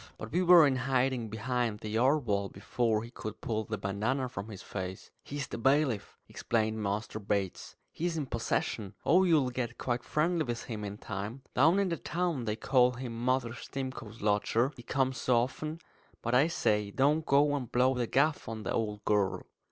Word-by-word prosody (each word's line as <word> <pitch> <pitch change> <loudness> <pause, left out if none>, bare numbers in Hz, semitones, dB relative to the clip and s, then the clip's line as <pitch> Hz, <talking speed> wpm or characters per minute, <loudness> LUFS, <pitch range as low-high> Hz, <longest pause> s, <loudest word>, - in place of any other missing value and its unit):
But 110 - -7
we 175 +5 +2
were 175 -3 +8
in 135 -2 +2
hiding 130 -2 0
behind 115 0 -2
the 110 - -5
yard 130 +6 +2
wall 100 -2 0
before 110 +2 -1
he 120 - -10
could 110 -3 -7
pull 110 -1 -2
the 110 0 -3
bandanna 110 +8 -1
from 100 -2 -6
his 100 -3 -9
face. 95 -1 -6
"He's 145 -1 -4
the - - -6
bailiff," 135 -3 +1
explained 110 -1 -1
Master 105 +2 -2
Bates. 100 -2 -2 0.2
"He's 170 0 -2
in 150 - -1
possession. 115 -4 -2
Oh, 185 +2 +5
you'll 150 -7 +3
get 120 -1 -3
quite 120 -1 -2
friendly 165 +2 +1
with 120 -4 -4
him 110 -3 -5
in 100 0 -5
time. 105 +6 -6
Down 160 +8 +5
in 200 -2 +2
the 170 - -1
town 165 -4 -2
they 105 -1 -1
call 125 +2 +3
him 125 -1 -6
Mother 130 -2 +1
Stimcoe's 120 -4 -6
lodger, 110 +5 +2
he - - -10
comes 130 +1 0
so 125 -2 +3
often. 155 +6 -4 0.4
But, 120 - -1
I 135 +5 +5
say, 105 -11 +1
don't 145 +8 +2
go 145 0 +4
and 130 -5 -4
blow 125 +2 +3
the 125 -2 -1
gaff 145 0 +1
on 110 -1 -5
the - - -3
old 105 -2 -2
girl." 105 -3 +1
120 Hz, 190 wpm, -31 LUFS, 110-135 Hz, 0.4 s, were